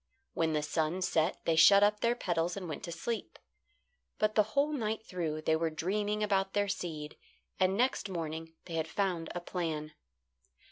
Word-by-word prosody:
When 160 -1 +1
the 150 -1 0
sun 160 +4 0
set 165 -1 0
they 165 - +3
shut 200 +5 +8
up 210 0 +3
their 235 +2 +2
petals 175 -4 -1
and 185 -3 -5
went 155 - -5
to 170 - -6
sleep; 230 +6 -4 0.8
but 215 0 +2
the 215 - +5 0.2
whole 290 +2 +4
night 220 -4 -2
through 160 -5 -3
they 160 - +3
were 165 0 0
dreaming 205 +6 -1
about 195 -2 +1
their 205 0 +2
seed, 160 -6 -4 0.4
and 185 +1 +3
next 245 -4 +1
morning 165 -2 -5
they 170 - -8
had 160 -1 -1
found 175 -2 -1
a - - -1
plan. 160 -4 -3
180 Hz, 180 wpm, -32 LUFS, 160-205 Hz, 0.8 s, shut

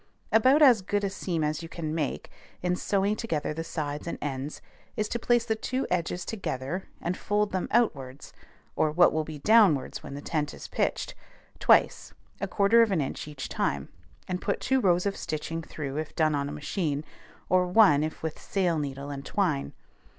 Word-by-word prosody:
About 260 +7 +5
as 245 -7 +7
good 205 +2 -1
a 195 - 0
seam 175 -4 -2
as 150 +1 -1
you 165 - -8
can 155 -3 -4
make, 155 -4 -3 0.3
in 180 0 +1
sewing 200 +2 +1
together 165 -10 -2
the 165 +2 -4
sides 150 -2 -4
and - - -3
ends, 140 +1 -4 0.4
is 215 -1 0
to 235 - -2
place 240 0 +2
the 225 - +1
two 260 +4 -2
edges 175 0 -1
together, 180 - -4
and 175 +2 -2
fold 210 +1 0
them 185 -1 -1
outwards 140 - 0 0.4
(or 155 - +2
what 175 +4 +5
will 155 0 0
be 155 0 -7
downwards 190 - +4
when 140 - -8
the - - -5
tent 150 -2 -2
is - - -9
pitched) - - -1 0.5
twice, - - +3 0.2
a - - -2
quarter 215 +3 +4
of 225 -2 +3
an 185 - +2
inch 140 +1 -3
each 145 -3 -6
time, 70 -1 -2 0.4
and 180 -1 -3
put 200 - -1
two 265 0 +1
rows 180 -3 +3
of 200 - 0
stitching 165 +2 -4
through 150 -3 -6
if 155 -1 -4
done 155 -1 +2
on 140 -1 -1
a - - -5
machine, 150 0 -2 0.4
or 185 0 +3
one 180 -7 +5
if 155 0 -5
with 160 -1 -4
sail 180 -5 0
needle 140 0 -4
and 140 -1 -6
twine. 165 -8 0
165 Hz, 195 wpm, -28 LUFS, 150-200 Hz, 0.5 s, as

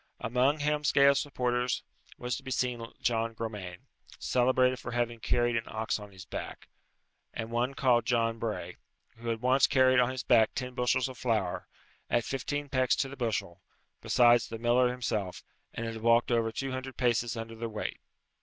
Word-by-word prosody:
Amongst 130 +6 +1
Helmsgail's 140 -2 +4
supporters 125 -3 -1 0.3
was 125 0 -3
to - - -7
be 135 - -8
seen 120 -2 -2
John 115 -1 0
Gromane, 105 -6 -6 0.3
celebrated 130 0 +2
for - - -6
having 120 -1 -1
carried 120 +1 +1
an 115 0 -1
ox 110 0 -2
on 105 -1 -11
his 95 -2 -12
back; - - -7 0.7
and 110 +1 -5
one 125 +3 0
called 120 -4 +2
John 115 -2 +1
Bray, 105 -6 -4 0.4
who 115 +1 -9
had 115 0 -3
once 130 +2 +4
carried 130 -1 +4
on 125 0 +3
his 130 -1 -4
back 115 -3 +4
ten 125 0 -4
bushels 125 0 +1
of 130 -2 -10
flour, 110 -7 -1 0.4
at 120 -1 +1
fifteen 145 +2 -3
pecks 130 -2 +2
to 135 - -1
the 140 - -8
bushel, 115 -8 -3 0.4
besides 120 -1 +4
the 115 - -6
miller 120 +2 +3
himself, 110 -7 -3 0.3
and 115 - -5
had 115 -1 -5
walked 115 +1 +3
over 115 -1 +2
two 135 +4 -4
hundred 130 0 -6
paces 120 -1 +1
under 115 0 -6
the 115 0 -5
weight. 110 - -5
120 Hz, 175 wpm, -30 LUFS, 115-130 Hz, 0.7 s, Helmsgail's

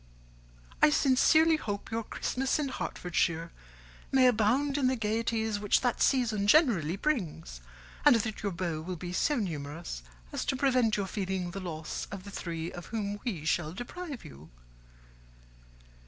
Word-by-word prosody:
I - - +8
sincerely 310 +3 +4
hope 205 -8 -5
your 225 +1 -1
Christmas 260 +4 -1
in 295 -3 -1
Hertfordshire 170 -7 -1 0.6
may 265 -1 +5
abound 250 +4 +3
in 265 - +3
the 260 - +2
gaieties 220 -1 -1
which 205 -1 +2
that 245 -2 0
season 225 -6 +2
generally 205 - +4
brings, 165 - -2 0.4
and - - +7
that 220 -1 -2
your 200 - -1
beaux 170 -3 -3
will 180 +3 -5
be 175 +1 -6
so 295 +10 +2
numerous 160 - -4 0.3
as - - -2
to - - 0
prevent 255 -5 +2
your 200 - -1
feeling 190 -2 -3
the 195 - -5
loss 160 -4 -5
of 195 -2 -7
the 200 - -9
three 165 -2 -4
of 175 -1 -9
whom 205 -2 -3
we 185 - -3
shall 160 -1 0
deprive 280 - -7
you. 70 +3 -12
205 Hz, 155 wpm, -30 LUFS, 175-255 Hz, 0.6 s, I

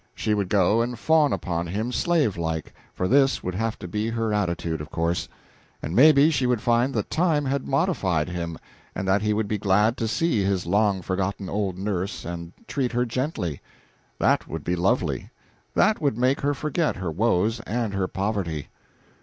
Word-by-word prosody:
She 110 - 0
would 100 -3 -1
go 105 +3 +3
and 120 +1 -2
fawn 155 +2 +3
upon 85 -1 -2
him, 110 +7 -2
slave 155 - +1
like 80 -2 -3 0.2
for 90 - -2
this 135 +2 +3
would 90 - -3
have 115 +4 -2
to 90 - -8
be 105 +5 -2
her 115 -1 -1
attitude, 85 -5 -1
of 75 - -8
course 85 +1 -1 0.5
and 80 - -5
maybe 150 +3 +7
she 135 -4 +1
would 125 -2 +2
find 120 +3 +2
that - - -2
time 160 -3 +2
had 135 0 -1
modified 135 - +1
him, 85 -2 -4 0.4
and 95 +1 -3
that 95 +1 +3
he 105 0 +1
would 105 0 0
be 105 0 -2
glad 105 +4 +2
to 115 - -1
see 115 -3 +1
his 95 -2 0
long 100 +1 +2
forgotten 95 +1 -2
old 100 -3 -2
nurse 95 0 -3
and 85 0 -6 0.2
treat 130 -3 -1
her 120 +1 +1
gently. 120 - -3 0.6
That - - +2
would - - -5
be 90 - 0
lovely; 90 - 0 0.5
that 215 -3 +3
would 140 -7 +1
make 130 +3 +2
her 145 +1 +1
forget 155 +3 -1
her 95 -4 -3
woes 110 +4 +1
and 115 -2 -2
her 95 -1 0
poverty. 95 -8 -3
105 Hz, 185 wpm, -25 LUFS, 90-125 Hz, 0.6 s, maybe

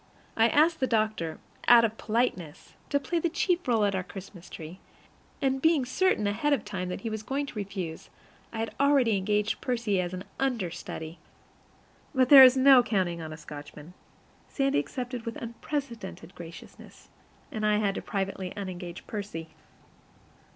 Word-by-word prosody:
I 225 0 +5
asked 320 +4 +3
the 260 - +1
doctor, 215 -8 0 0.3
out 235 -1 +8
of 220 0 -4
politeness, 210 -9 -2 0.2
to 285 - +2
play 335 +5 -1
the 340 - 0
chief 350 0 0
role 225 -4 +3
at 200 - +1
our 190 - 0
Christmas 185 -1 -11
tree; 165 +4 -9 0.6
and 265 0 +1
being 320 -4 +3
certain 260 - +1
ahead 225 +9 +1
of 280 - -1
time 185 -3 -4
that 180 - -5
he 230 - -3
was 215 -1 -3
going 275 +6 -2
to - - -9
refuse, 190 -6 -5 0.4
I 230 - -7
had 225 - -3
already 275 -6 +4
engaged 210 +2 0
Percy 230 -7 0
as 175 -1 -3
an 185 0 -6 0.2
understudy. 180 -9 -3 1.0
But 255 -1 +3
there 275 -2 +12
is 260 0 +7
no 265 -1 +8
counting 185 -7 -1
on 160 -1 -6
a 155 - -7
Scotchman. 150 +2 -10 0.6
Sandy 275 - +1
accepted 245 - -5
with 230 0 -5
unprecedented 230 - -6
graciousness, 165 -2 -12 0.4
and 215 - -4
I 210 0 +3
had 200 -2 -1
privately 195 -1 -3
to - - -12
unengage 180 -3 -6
Percy! 195 -7 -6
215 Hz, 165 wpm, -28 LUFS, 185-260 Hz, 1.0 s, there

